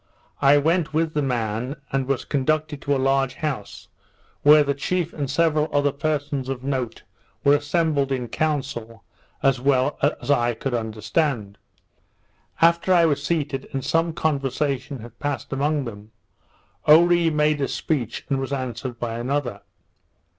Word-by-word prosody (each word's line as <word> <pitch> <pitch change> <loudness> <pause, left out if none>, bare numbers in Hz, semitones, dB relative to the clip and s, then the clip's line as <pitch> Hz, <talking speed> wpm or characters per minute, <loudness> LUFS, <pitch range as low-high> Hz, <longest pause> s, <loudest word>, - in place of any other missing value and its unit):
I 140 +1 +6
went 160 +1 +1
with 160 0 +1
the 150 - +1
man, 125 0 -2 0.2
and 135 -1 -1
was 135 -2 -1
conducted 150 +1 -1
to 140 -1 0
a - - +1
large 135 0 +1
house, 145 -9 -5 0.5
where 150 +1 +7
the 140 0 0
chief 170 +4 -2
and 140 -3 -3
several 155 +1 +2
other 145 0 +2
persons 145 -2 -2
of 130 -1 -4
note 130 -4 -3 0.4
were 140 - +5
assembled 145 -2 0
in 125 -2 -1
council, 120 -6 -3 0.4
as 135 -2 +3
well 135 +1 +2 0.2
as - - -2
I 120 -4 +2
could 135 +3 -4
understand. 110 - -1 1.0
After 170 +2 +4
I 175 -2 +6
was 145 -3 +1
seated, 145 -4 -2
and 135 -2 -3
some 165 +1 +1
conversation 140 -3 -1
had 120 0 -12
passed 145 -4 -3
among 145 +1 0
them, 105 -2 -9 0.8
Oree 170 +2 +6
made 150 -1 +1
a 135 - +1
speech, 135 -9 -2
and 135 -3 0
was 135 0 -4
answered 130 -2 -4
by 115 -1 -3
another. 125 -4 -2
140 Hz, 150 wpm, -23 LUFS, 130-150 Hz, 1.0 s, where